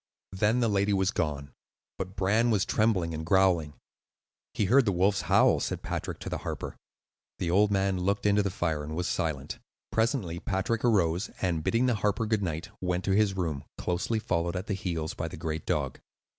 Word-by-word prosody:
Then 105 Hz, +6 st, +2 dB
the 115 Hz, -, +3 dB
lady 100 Hz, -1 st, +2 dB
was 95 Hz, 0 st, +2 dB
gone; 75 Hz, -, -2 dB, 0.5 s
but 95 Hz, 0 st, -5 dB
Bran 105 Hz, +5 st, +2 dB
was 105 Hz, -4 st, +2 dB
trembling 95 Hz, -7 st, +1 dB
and 80 Hz, 0 st, -4 dB
growling. 85 Hz, -4 st, +2 dB, 0.8 s
"He 105 Hz, -, +1 dB
heard 130 Hz, +6 st, +5 dB
the 100 Hz, -, +2 dB
wolves 95 Hz, +2 st, +2 dB
howl," -, -, +4 dB
said -, -, -3 dB
Patrick -, -, -4 dB
to -, -, -5 dB
the -, -, -3 dB
harper. -, -, -5 dB, 0.6 s
The 85 Hz, -, -1 dB
old 100 Hz, +3 st, +4 dB
man 95 Hz, -1 st, +1 dB
looked 100 Hz, +3 st, 0 dB
into 105 Hz, 0 st, +4 dB
the 100 Hz, -, 0 dB
fire 80 Hz, -5 st, -1 dB
and 75 Hz, +1 st, -5 dB
was 90 Hz, +1 st, -1 dB
silent. 75 Hz, -6 st, -2 dB, 0.3 s
Presently 110 Hz, -, 0 dB
Patrick 100 Hz, +5 st, -1 dB
arose, 95 Hz, -7 st, +2 dB
and 85 Hz, -4 st, 0 dB
bidding 115 Hz, +8 st, +2 dB
the 125 Hz, -, +3 dB
harper 105 Hz, +2 st, +1 dB
good 110 Hz, -1 st, +1 dB
night, 80 Hz, -3 st, -3 dB
went 90 Hz, 0 st, -1 dB
to 95 Hz, -, 0 dB
his 100 Hz, -1 st, +3 dB
room, 80 Hz, -6 st, -2 dB
closely 90 Hz, +6 st, -1 dB
followed 85 Hz, -4 st, -1 dB
at 90 Hz, +1 st, -3 dB
the 105 Hz, -, -2 dB
heels 85 Hz, -5 st, -3 dB
by 80 Hz, -, -4 dB
the 80 Hz, -, -8 dB
great 80 Hz, -1 st, -4 dB
dog. 70 Hz, -4 st, -1 dB
95 Hz, 195 wpm, -28 LUFS, 85-105 Hz, 0.8 s, heard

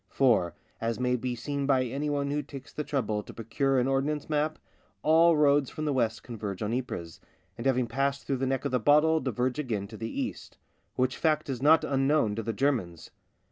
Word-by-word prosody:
For, 115 Hz, -10 st, +2 dB, 0.3 s
as 115 Hz, +1 st, -1 dB
may 125 Hz, 0 st, +1 dB
be 125 Hz, 0 st, -3 dB
seen 140 Hz, +3 st, -3 dB
by 130 Hz, -2 st, +3 dB
anyone 140 Hz, +2 st, -2 dB
who 150 Hz, +1 st, 0 dB
takes 140 Hz, -2 st, -11 dB
the 150 Hz, -, -3 dB
trouble 110 Hz, -8 st, -1 dB
to -, -, -12 dB
procure 130 Hz, +4 st, 0 dB
an 125 Hz, 0 st, +2 dB
ordnance 135 Hz, +2 st, 0 dB
map, 150 Hz, +1 st, 0 dB, 0.5 s
all 165 Hz, +1 st, +5 dB
roads 145 Hz, -2 st, +4 dB
from 155 Hz, -, -5 dB
the 145 Hz, -, +1 dB
west 115 Hz, -3 st, 0 dB
converge 105 Hz, -5 st, -5 dB
on 105 Hz, +2 st, -1 dB
Ypres, 90 Hz, -10 st, -4 dB, 0.4 s
and 115 Hz, -, -3 dB
having 130 Hz, -2 st, +2 dB
passed 135 Hz, +4 st, -1 dB
through 135 Hz, -, -1 dB
the 135 Hz, +1 st, -1 dB
neck 130 Hz, -1 st, -1 dB
of -, -, -1 dB
the 125 Hz, -, +2 dB
bottle 150 Hz, +6 st, +4 dB
diverge 125 Hz, 0 st, -1 dB
again 110 Hz, -9 st, -2 dB
to 110 Hz, -, -9 dB
the 115 Hz, +2 st, -4 dB
east; -, -, -5 dB, 0.4 s
which 130 Hz, 0 st, 0 dB
fact 155 Hz, -2 st, +1 dB
is 125 Hz, -2 st, -4 dB
not 155 Hz, +3 st, +5 dB
unknown 135 Hz, -4 st, +2 dB
to 115 Hz, -, -3 dB
the 115 Hz, +1 st, -2 dB
Germans. 105 Hz, -, -1 dB
130 Hz, 205 wpm, -28 LUFS, 115-145 Hz, 0.5 s, all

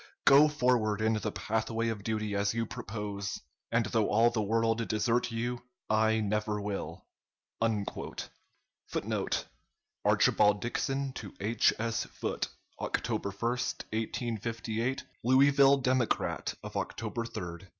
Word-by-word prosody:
Go 140 Hz, +3 st, +8 dB
forward 125 Hz, -8 st, +2 dB
in 110 Hz, +1 st, +2 dB
the 105 Hz, -2 st, -1 dB
pathway 110 Hz, +4 st, -1 dB
of 105 Hz, -3 st, -4 dB
duty 110 Hz, -1 st, -1 dB
as 100 Hz, +2 st, +1 dB
you 115 Hz, 0 st, 0 dB
propose, 105 Hz, -4 st, -5 dB, 0.3 s
and 115 Hz, 0 st, +2 dB
though 110 Hz, 0 st, +1 dB
all 115 Hz, +3 st, +4 dB
the 110 Hz, -, 0 dB
world 115 Hz, +2 st, +1 dB
desert 115 Hz, +3 st, +1 dB
you, 120 Hz, +2 st, -2 dB, 0.3 s
I 110 Hz, 0 st, +3 dB
never 105 Hz, 0 st, 0 dB
will.'" 95 Hz, -4 st, -4 dB, 1.8 s
[Footnote: -, -, -1 dB, 0.6 s
Archibald 105 Hz, 0 st, +4 dB
Dixon 135 Hz, +3 st, -2 dB
to 100 Hz, -6 st, -8 dB
H. 110 Hz, +3 st, +3 dB
S. 115 Hz, 0 st, -1 dB
Foote, -, -, -3 dB, 0.3 s
October -, -, -1 dB
1, 100 Hz, +4 st, -1 dB, 0.4 s
1858. 115 Hz, +2 st, -2 dB, 0.2 s
"Louisville 140 Hz, +2 st, +6 dB
Democrat" 130 Hz, -2 st, 0 dB
of -, -, -8 dB
October 115 Hz, -, -3 dB
3, 115 Hz, -, -9 dB
1858. 85 Hz, +1 st, -6 dB
115 Hz, 120 wpm, -31 LUFS, 105-120 Hz, 1.8 s, Go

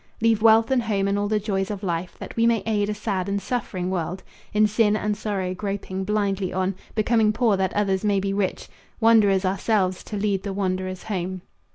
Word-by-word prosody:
Leave 225 Hz, -1 st, +2 dB
wealth 225 Hz, +2 st, +5 dB
and 260 Hz, -2 st, +3 dB
home 205 Hz, -4 st, 0 dB
and 200 Hz, +1 st, +1 dB
all 205 Hz, -, 0 dB
the 215 Hz, 0 st, +1 dB
joys 195 Hz, -1 st, -2 dB
of 205 Hz, -1 st, -5 dB
life, 175 Hz, -1 st, -3 dB
That -, -, -8 dB
we 230 Hz, 0 st, +3 dB
may 230 Hz, -3 st, +2 dB
aid 210 Hz, -2 st, 0 dB
a -, -, 0 dB
sad 200 Hz, -3 st, -2 dB
and 200 Hz, 0 st, 0 dB
suffering 195 Hz, -6 st, -3 dB
world 180 Hz, +1 st, -3 dB, 0.3 s
In 210 Hz, +1 st, +4 dB
sin 215 Hz, 0 st, +2 dB
and 210 Hz, -1 st, -1 dB
sorrow 200 Hz, -3 st, -2 dB
groping 190 Hz, -1 st, -4 dB
blindly 200 Hz, -2 st, 0 dB
on, 185 Hz, +1 st, 0 dB, 0.2 s
Becoming 220 Hz, 0 st, +3 dB
poor 220 Hz, -1 st, +2 dB
that 190 Hz, -1 st, 0 dB
others 195 Hz, -2 st, +1 dB
may 205 Hz, -2 st, +2 dB
be 195 Hz, 0 st, -1 dB
rich, 195 Hz, -2 st, -2 dB, 0.3 s
Wanderers 210 Hz, -4 st, +4 dB
ourselves 190 Hz, -1 st, 0 dB
to 210 Hz, -, -5 dB
lead 200 Hz, -2 st, 0 dB
the 200 Hz, 0 st, -4 dB
wanderers 185 Hz, -1 st, -2 dB
home. 185 Hz, -3 st, -4 dB
200 Hz, 205 wpm, -24 LUFS, 190-215 Hz, 0.3 s, wealth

